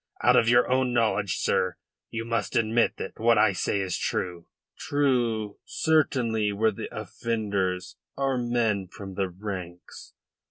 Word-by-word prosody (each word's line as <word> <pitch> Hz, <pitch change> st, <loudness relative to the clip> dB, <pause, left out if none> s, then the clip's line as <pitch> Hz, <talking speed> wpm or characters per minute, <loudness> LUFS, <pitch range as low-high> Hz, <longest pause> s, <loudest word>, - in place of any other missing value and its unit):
Out -, -, +6 dB
of 115 Hz, -, +4 dB
your 120 Hz, +1 st, +5 dB
own 130 Hz, -1 st, +1 dB
knowledge, 110 Hz, -4 st, +1 dB
sir, -, -, 0 dB, 0.3 s
you 115 Hz, 0 st, -4 dB
must 115 Hz, 0 st, -2 dB
admit 115 Hz, +1 st, +2 dB
that -, -, -7 dB
what 115 Hz, 0 st, +4 dB
I 105 Hz, -1 st, +4 dB
say 100 Hz, -, 0 dB
is 95 Hz, -2 st, -2 dB
true." 90 Hz, -2 st, -3 dB, 0.3 s
"True, 120 Hz, -7 st, 0 dB
certainly, 120 Hz, -9 st, +1 dB
where 110 Hz, +2 st, +2 dB
the 100 Hz, -, -6 dB
offenders 100 Hz, -5 st, -2 dB, 0.2 s
are 135 Hz, -1 st, +1 dB
men 115 Hz, -5 st, 0 dB
from 95 Hz, +1 st, -9 dB
the 95 Hz, 0 st, -1 dB
ranks. 90 Hz, -2 st, -8 dB
110 Hz, 145 wpm, -26 LUFS, 100-120 Hz, 0.3 s, Out